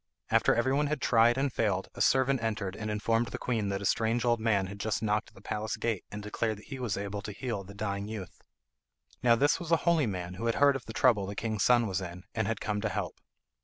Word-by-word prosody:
After -, -, +4 dB
everyone 135 Hz, +5 st, +2 dB
had 150 Hz, 0 st, -1 dB
tried 120 Hz, 0 st, +4 dB
and 135 Hz, -2 st, 0 dB
failed -, -, 0 dB
a -, -, -6 dB
servant 130 Hz, -1 st, +3 dB
entered 105 Hz, -4 st, -2 dB
and 110 Hz, -1 st, -4 dB
informed 115 Hz, +2 st, +1 dB
the -, -, -5 dB
queen 110 Hz, -5 st, -1 dB
that 100 Hz, 0 st, -2 dB
a -, -, -3 dB
strange 115 Hz, +4 st, +1 dB
old 120 Hz, -1 st, +3 dB
man 110 Hz, -4 st, +2 dB
had 100 Hz, +2 st, -8 dB
just 110 Hz, 0 st, -1 dB
knocked 105 Hz, 0 st, 0 dB
at -, -, -28 dB
the -, -, -14 dB
palace 105 Hz, +1 st, -3 dB
gate 115 Hz, -5 st, -2 dB
and 105 Hz, 0 st, -7 dB
declared 110 Hz, +1 st, -2 dB
that 105 Hz, -, -14 dB
he 135 Hz, -2 st, -6 dB
was 120 Hz, -7 st, -2 dB
able 100 Hz, 0 st, -4 dB
to 105 Hz, -, -6 dB
heal 110 Hz, -2 st, -4 dB
the 100 Hz, +1 st, -12 dB
dying 100 Hz, -1 st, -3 dB
youth. 105 Hz, -5 st, -7 dB, 0.8 s
Now 120 Hz, -1 st, +5 dB
this 145 Hz, +5 st, +3 dB
was 170 Hz, -3 st, -6 dB
a 165 Hz, -, +6 dB
holy 165 Hz, -6 st, +3 dB
man, 90 Hz, -3 st, -4 dB
who 115 Hz, +6 st, -3 dB
had 115 Hz, -, +1 dB
heard 140 Hz, -1 st, +5 dB
of 135 Hz, -, -5 dB
the 110 Hz, -, -8 dB
trouble 110 Hz, -7 st, +3 dB
the 100 Hz, -, -5 dB
king's 110 Hz, -2 st, -2 dB
son 120 Hz, -1 st, +5 dB
was 95 Hz, -2 st, -1 dB
in, 90 Hz, 0 st, -7 dB
and 110 Hz, -3 st, -1 dB
had 115 Hz, -1 st, -1 dB
come 105 Hz, -1 st, -2 dB
to 110 Hz, -, 0 dB
help. -, -, -3 dB
110 Hz, 255 wpm, -30 LUFS, 100-120 Hz, 0.8 s, a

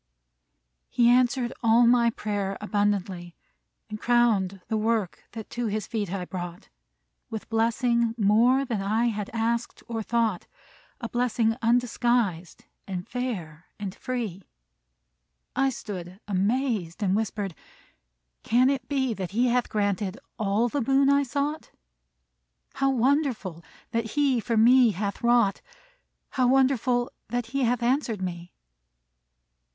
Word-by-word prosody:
He 240 Hz, -1 st, +3 dB
answered 245 Hz, 0 st, +3 dB
all 230 Hz, +1 st, +5 dB
my 235 Hz, 0 st, +5 dB
prayer 205 Hz, -3 st, -3 dB
abundantly, 200 Hz, -4 st, -1 dB, 0.5 s
And 215 Hz, -1 st, -7 dB
crowned 220 Hz, -6 st, +2 dB
the 220 Hz, -, -1 dB
work 220 Hz, -4 st, -1 dB
that 220 Hz, -2 st, -7 dB
to 240 Hz, -1 st, -2 dB
his 215 Hz, -1 st, -2 dB
feet 210 Hz, -5 st, -3 dB
I 190 Hz, -2 st, -3 dB
brought, 175 Hz, -1 st, -7 dB, 0.6 s
With 220 Hz, -2 st, -6 dB
blessing 230 Hz, +1 st, +1 dB
more 235 Hz, +6 st, +4 dB
than 230 Hz, -6 st, -2 dB
I 220 Hz, +4 st, +1 dB
had 210 Hz, -2 st, -4 dB
asked 230 Hz, +1 st, -2 dB
or 230 Hz, -2 st, -3 dB
thought, 225 Hz, -4 st, 0 dB, 0.5 s
A 235 Hz, -, -3 dB
blessing 235 Hz, -2 st, +1 dB
undisguised, 235 Hz, -6 st, 0 dB, 0.2 s
and 185 Hz, -2 st, -5 dB
fair, 185 Hz, -11 st, -5 dB
and 200 Hz, -3 st, -5 dB
free. 225 Hz, -8 st, -4 dB, 1.1 s
I 270 Hz, +1 st, +3 dB
stood 190 Hz, -6 st, -7 dB
amazed, 210 Hz, -2 st, -1 dB
and 190 Hz, -1 st, +2 dB
whispered, 205 Hz, -3 st, -2 dB, 0.9 s
"Can 250 Hz, +4 st, +3 dB
it 265 Hz, -3 st, -4 dB
be 265 Hz, -4 st, 0 dB
That 190 Hz, -4 st, -5 dB
he 245 Hz, +3 st, +2 dB
hath 245 Hz, 0 st, +1 dB
granted 205 Hz, -1 st, -1 dB, 0.2 s
all 215 Hz, +3 st, +1 dB
the 280 Hz, +4 st, -2 dB
boon 275 Hz, +3 st, +3 dB
I 280 Hz, 0 st, +4 dB
sought? 285 Hz, +3 st, -2 dB, 1.0 s
How 275 Hz, 0 st, +1 dB
wonderful 255 Hz, -, 0 dB, 0.3 s
that 230 Hz, -1 st, -2 dB
he 280 Hz, -4 st, +2 dB
for 230 Hz, 0 st, -1 dB
me 240 Hz, 0 st, +6 dB
hath 200 Hz, +1 st, -3 dB
wrought! 235 Hz, -4 st, +3 dB, 0.7 s
How 255 Hz, -1 st, +2 dB
wonderful 255 Hz, -2 st, +2 dB, 0.2 s
that 245 Hz, +1 st, -2 dB
he 275 Hz, -2 st, +1 dB
hath 240 Hz, 0 st, 0 dB
answered 240 Hz, -5 st, 0 dB
me!" 175 Hz, -1 st, -5 dB
230 Hz, 130 wpm, -26 LUFS, 200-245 Hz, 1.1 s, me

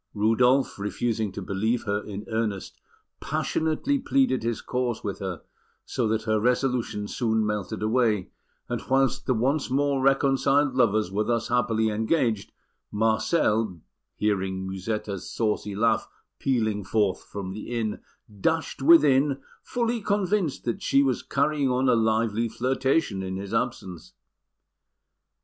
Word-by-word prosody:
Rudolf, 125 Hz, +5 st, +2 dB
refusing 110 Hz, +1 st, -1 dB
to 100 Hz, -, -6 dB
believe 110 Hz, +6 st, -1 dB
her 100 Hz, 0 st, -1 dB
in 105 Hz, 0 st, -7 dB
earnest, 110 Hz, -4 st, -3 dB, 0.4 s
passionately 160 Hz, -, 0 dB
pleaded 270 Hz, -, +2 dB
his 115 Hz, -1 st, -2 dB
cause 125 Hz, -2 st, -2 dB
with 100 Hz, -, -4 dB
her, 95 Hz, -3 st, -5 dB, 0.4 s
so 120 Hz, -, -1 dB
that 110 Hz, 0 st, 0 dB
her 110 Hz, -1 st, +1 dB
resolution 125 Hz, -3 st, 0 dB
soon 110 Hz, -2 st, 0 dB
melted 105 Hz, 0 st, -3 dB
away; 110 Hz, -4 st, +1 dB, 0.4 s
and -, -, -3 dB
whilst 135 Hz, 0 st, +1 dB
the 130 Hz, -, +2 dB
once 135 Hz, +6 st, 0 dB
more 140 Hz, +1 st, +1 dB
reconciled 135 Hz, +1 st, +3 dB
lovers 110 Hz, -6 st, +2 dB
were 105 Hz, +2 st, 0 dB
thus 115 Hz, -1 st, -1 dB
happily 110 Hz, -2 st, +1 dB
engaged, 110 Hz, -1 st, 0 dB, 0.4 s
Marcel, 110 Hz, -, +1 dB, 0.4 s
hearing 95 Hz, -2 st, -1 dB
Musetta's 100 Hz, 0 st, -4 dB
saucy 105 Hz, -2 st, -1 dB
laugh 110 Hz, +2 st, +2 dB, 0.3 s
pealing 110 Hz, -6 st, 0 dB
forth 100 Hz, -1 st, 0 dB
from 95 Hz, -2 st, -6 dB
the 105 Hz, +3 st, -7 dB
inn, 115 Hz, -3 st, -2 dB, 0.4 s
dashed 160 Hz, +4 st, -1 dB
within, 140 Hz, -2 st, +5 dB, 0.2 s
fully 235 Hz, -1 st, -1 dB
convinced 200 Hz, -5 st, 0 dB
that 120 Hz, -, -2 dB
she 140 Hz, -, +3 dB
was 130 Hz, -3 st, 0 dB
carrying 150 Hz, -3 st, 0 dB
on 130 Hz, +1 st, +1 dB
a -, -, +5 dB
lively 115 Hz, 0 st, +1 dB
flirtation 130 Hz, -1 st, 0 dB
in 95 Hz, 0 st, -4 dB
his 100 Hz, +2 st, -6 dB
absence. 95 Hz, -, -3 dB
115 Hz, 130 wpm, -26 LUFS, 105-135 Hz, 0.4 s, within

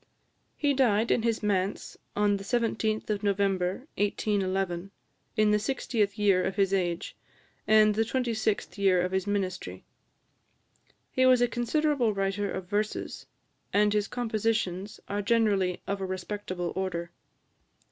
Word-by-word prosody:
He 290 Hz, -1 st, +2 dB
died 235 Hz, -4 st, +2 dB
in -, -, +3 dB
his 230 Hz, -1 st, 0 dB
manse, 195 Hz, -1 st, -1 dB, 0.2 s
on 205 Hz, -1 st, +2 dB
the 195 Hz, -, -8 dB
17th 220 Hz, -1 st, 0 dB
of 205 Hz, -1 st, -1 dB
November 195 Hz, +1 st, 0 dB
1811, 195 Hz, -3 st, 0 dB, 0.5 s
in 215 Hz, -1 st, +4 dB
the 210 Hz, -, +3 dB
60th 215 Hz, -3 st, -1 dB
year 200 Hz, -3 st, +3 dB
of 190 Hz, -, -2 dB
his 195 Hz, -1 st, +2 dB
age, 175 Hz, -3 st, -1 dB, 0.5 s
and 215 Hz, -1 st, +6 dB
the 215 Hz, -, +1 dB
26th 225 Hz, -5 st, -1 dB
year 190 Hz, -2 st, +4 dB
of 180 Hz, +1 st, 0 dB
his 190 Hz, +1 st, -1 dB
ministry. 185 Hz, -, -3 dB, 1.3 s
He 260 Hz, 0 st, +3 dB
was 255 Hz, -1 st, +6 dB
a 245 Hz, -, +4 dB
considerable 245 Hz, -1 st, +1 dB
writer 195 Hz, +1 st, -1 dB
of 190 Hz, -1 st, -4 dB
verses, 210 Hz, +2 st, -3 dB, 0.4 s
and 210 Hz, 0 st, +3 dB
his 210 Hz, 0 st, +1 dB
compositions 215 Hz, -4 st, -2 dB
are 205 Hz, +1 st, -2 dB
generally 200 Hz, -5 st, +1 dB
of 200 Hz, 0 st, -3 dB
a -, -, -1 dB
respectable 185 Hz, -1 st, -4 dB
order. 170 Hz, -3 st, -3 dB
205 Hz, 135 wpm, -28 LUFS, 190-220 Hz, 1.3 s, and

